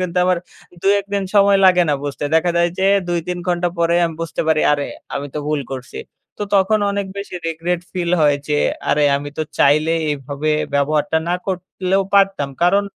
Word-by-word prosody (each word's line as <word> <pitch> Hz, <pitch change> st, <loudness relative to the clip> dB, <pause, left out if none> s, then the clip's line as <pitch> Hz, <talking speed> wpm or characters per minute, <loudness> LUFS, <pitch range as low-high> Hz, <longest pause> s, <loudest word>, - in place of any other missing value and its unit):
কিন্তু 180 Hz, -1 st, -1 dB
আমার 180 Hz, -1 st, +2 dB, 0.4 s
২-১ 200 Hz, 0 st, +2 dB
দিন 200 Hz, -1 st, 0 dB
সময় 200 Hz, -1 st, +5 dB
লাগে 180 Hz, -1 st, +6 dB
না 145 Hz, -, +3 dB
বুঝতে। 145 Hz, +1 st, -4 dB
দেখা 170 Hz, +2 st, +3 dB
যায় 170 Hz, 0 st, +3 dB
যে 190 Hz, -, +2 dB, 0.2 s
২-৩ 175 Hz, +1 st, -2 dB
ঘন্টা 175 Hz, 0 st, +1 dB
পরেই 170 Hz, +1 st, +2 dB
আমি 165 Hz, -1 st, -2 dB
বুঝতে 165 Hz, -2 st, -3 dB
পারি 155 Hz, -1 st, +3 dB
"আরে! 145 Hz, -1 st, 0 dB, 0.3 s
আমি 140 Hz, +1 st, -3 dB
তো -, -, -2 dB
ভুল 150 Hz, -2 st, 0 dB
করছি।" 130 Hz, -1 st, -7 dB, 0.4 s
তো -, -, -3 dB
তখন 200 Hz, +2 st, +3 dB
অনেক 200 Hz, -1 st, -2 dB
বেশি 200 Hz, -2 st, -7 dB
regret 170 Hz, +2 st, -2 dB
ফিল 175 Hz, -2 st, -2 dB
হয় 145 Hz, -1 st, +4 dB
যে 150 Hz, 0 st, +1 dB, 0.3 s
"আরে 150 Hz, 0 st, +3 dB
আমি 145 Hz, +1 st, -5 dB
তো -, -, +1 dB, 0.2 s
চাইলেই 155 Hz, +3 st, +3 dB
এভাবে 145 Hz, +2 st, -3 dB, 0.2 s
ব্যবহারটা 150 Hz, +2 st, +1 dB
না 175 Hz, -, +1 dB
করলেও 185 Hz, +1 st, -1 dB
পারতাম।" 195 Hz, -8 st, +3 dB
কারণ 200 Hz, +3 st, +3 dB
170 Hz, 185 wpm, -19 LUFS, 150-185 Hz, 0.4 s, লাগে